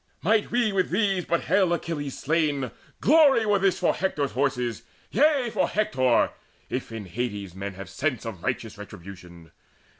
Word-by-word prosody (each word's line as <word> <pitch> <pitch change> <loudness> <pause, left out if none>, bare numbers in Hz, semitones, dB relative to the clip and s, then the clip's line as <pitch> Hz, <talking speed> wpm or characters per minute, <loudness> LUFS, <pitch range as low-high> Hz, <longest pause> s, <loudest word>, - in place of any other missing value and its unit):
Might 215 +4 +2
we 240 -3 +2
with 185 -1 +1
these 195 -2 +1
but 170 - +1
hale 190 0 +2
Achilles 150 -5 -3
slain, 145 -4 0 0.3
Glory 285 -6 +5
were 205 -1 +3
this 190 -2 +2
for 180 - +2
Hector's 150 -7 -1
horses, 125 -4 -1 0.3
yea, 275 -2 +3
For 190 - +2
Hector 130 - +2 0.4
if - - -3
in 110 -3 -6
Hades 100 -1 -4
men 95 0 -6
have 95 -1 -8
sense 130 - -2
Of 105 -7 -6
righteous - - -3
retribution. 90 -2 -11
145 Hz, 155 wpm, -26 LUFS, -, 0.4 s, Glory